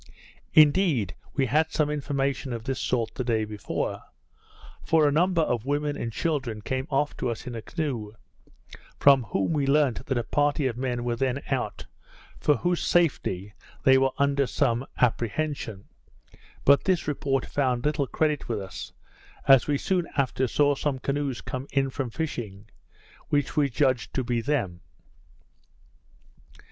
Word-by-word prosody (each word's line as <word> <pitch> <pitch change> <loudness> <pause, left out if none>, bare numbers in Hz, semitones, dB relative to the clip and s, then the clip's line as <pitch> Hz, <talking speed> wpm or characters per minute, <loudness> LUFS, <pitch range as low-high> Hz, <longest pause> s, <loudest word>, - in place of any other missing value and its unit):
Indeed, 150 - +4 0.2
we 135 - +2
had 155 +5 +2
some 150 -1 +1
information 140 -2 -2
of 115 -1 -5
this 135 +2 -3
sort 115 -3 -1
the 130 - -3
day 115 -3 0
before; 105 -1 -4 0.8
for 160 -2 +4
a - - +3
number 170 +2 +3
of 120 -4 -2
women 145 +1 0
and 115 -4 -4
children 130 -7 -2
came 130 +3 -2
off 145 +2 0
to - - -1
us 115 +2 -5
in 125 - -6
a 115 - -5
canoe, 125 -9 -4 0.8
from 135 -4 +5
whom 100 +7 -1
we 145 -3 0
learnt 140 -3 +2
that 135 - 0
a 120 - 0
party 145 +3 +1
of 125 -3 0
men 125 -1 -2
were 120 -1 -1
then 135 +2 -1
out, - - -2 0.5
for 150 - +3
whose 175 +2 0
safety 105 - +1 0.3
they 130 -1 +6
were 135 0 +3
under 140 -1 +2
some 125 -2 0
apprehension; 120 -2 -1 0.8
but 140 0 +5
this 185 -5 +1
report 135 -2 0
found 130 -3 0
little 150 -2 +1
credit 150 -2 -1
with 110 -3 -1
us, 95 -1 -8 0.5
as 135 -2 +7
we 145 -1 +2
soon 180 +2 0
after 130 -1 +1
saw 145 +4 +3
some 140 -1 -1
canoes 140 -1 -2
come 130 +2 -5
in 135 -1 +1
from 130 -1 -3
fishing, 110 -8 -5 0.6
which 145 -2 0
we 145 -2 +3
judged 130 -1 0
to 130 - 0
be 120 -1 -1
them. 115 -11 -1
135 Hz, 155 wpm, -26 LUFS, 120-145 Hz, 0.8 s, as